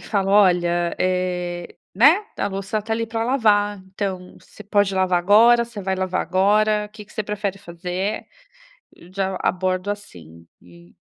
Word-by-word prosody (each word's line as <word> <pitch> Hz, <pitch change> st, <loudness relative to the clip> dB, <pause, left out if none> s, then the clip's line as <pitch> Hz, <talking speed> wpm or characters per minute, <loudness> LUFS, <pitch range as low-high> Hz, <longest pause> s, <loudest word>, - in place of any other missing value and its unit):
falo: 195 Hz, -3 st, -1 dB
"Olha, 175 Hz, -4 st, +3 dB
eh, 180 Hz, -1 st, -2 dB, 0.2 s
né, 295 Hz, -, +5 dB
a -, -, 0 dB
louça 195 Hz, +2 st, -3 dB
tá 225 Hz, -, -4 dB
ali 230 Hz, 0 st, -1 dB
para 225 Hz, 0 st, -3 dB
lavar, 210 Hz, -5 st, +2 dB, 0.2 s
então 185 Hz, -2 st, -4 dB
você 210 Hz, -, -15 dB
pode 205 Hz, -1 st, +1 dB
lavar 185 Hz, -1 st, +2 dB
agora, 230 Hz, +6 st, +5 dB
você 230 Hz, -3 st, -9 dB
vai 190 Hz, 0 st, -1 dB
lavar 185 Hz, 0 st, -1 dB
agora, 210 Hz, +3 st, +2 dB
o -, -, -32 dB
que 215 Hz, -1 st, -11 dB
que -, -, -20 dB
você 215 Hz, -, -3 dB
prefere 205 Hz, -1 st, -3 dB
fazer?". 180 Hz, +3 st, -4 dB, 0.9 s
Já 190 Hz, -1 st, -2 dB
abordo 185 Hz, +1 st, -1 dB
assim, 85 Hz, -, -11 dB
e 85 Hz, 0 st, -19 dB
195 Hz, 155 wpm, -21 LUFS, 180-210 Hz, 0.9 s, né